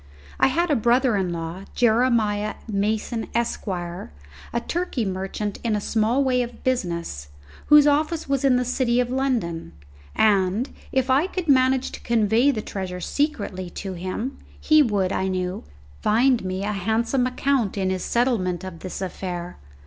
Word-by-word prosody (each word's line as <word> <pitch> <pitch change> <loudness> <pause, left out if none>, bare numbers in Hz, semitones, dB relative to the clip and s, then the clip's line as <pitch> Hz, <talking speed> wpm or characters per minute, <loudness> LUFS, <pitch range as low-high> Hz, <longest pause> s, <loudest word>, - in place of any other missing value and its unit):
I - - +5
had 330 +5 +1
a - - +4
brother 240 +1 +3
in 190 -3 0
law, 170 +3 -5
Jeremiah 220 -3 +2
Mason, 220 +2 -1
Esq., 235 -1 -1
a 170 - -6
Turkey 335 -9 -1
merchant 195 +2 -3
in 225 -3 +1
a - - 0
small 225 +6 +1
way 255 -2 +2
of 240 0 -6
business, 170 - -2 0.4
whose 300 -1 +8
office 305 +2 +1
was 275 -1 0
in 270 -2 +4
the 250 0 +1
City 245 -1 +1
of 245 0 0
London, 235 - -1 0.4
and, 205 +3 +2 0.2
if 265 0 +1
I 280 +7 +3
could 370 -3 -4
manage 260 -1 +3
to - - -8
convey 230 +3 +3
the 220 -6 -1
treasure 185 -2 -5
secretly 195 - -2 0.2
to 190 - -3
him, 185 +9 -4 0.2
he 310 -1 +5
would, 200 -8 +1
I 190 - 0
knew, 185 - -3 0.4
find 240 +2 +3
me 185 +1 -3
a 210 - -1
handsome 225 +6 0
account 255 -5 0
in 190 -1 0
his 185 -1 -2
settlement 220 -8 0
of 185 -3 -7
this 185 +1 -5
affair. 180 -2 -5
220 Hz, 160 wpm, -23 LUFS, 185-255 Hz, 0.4 s, whose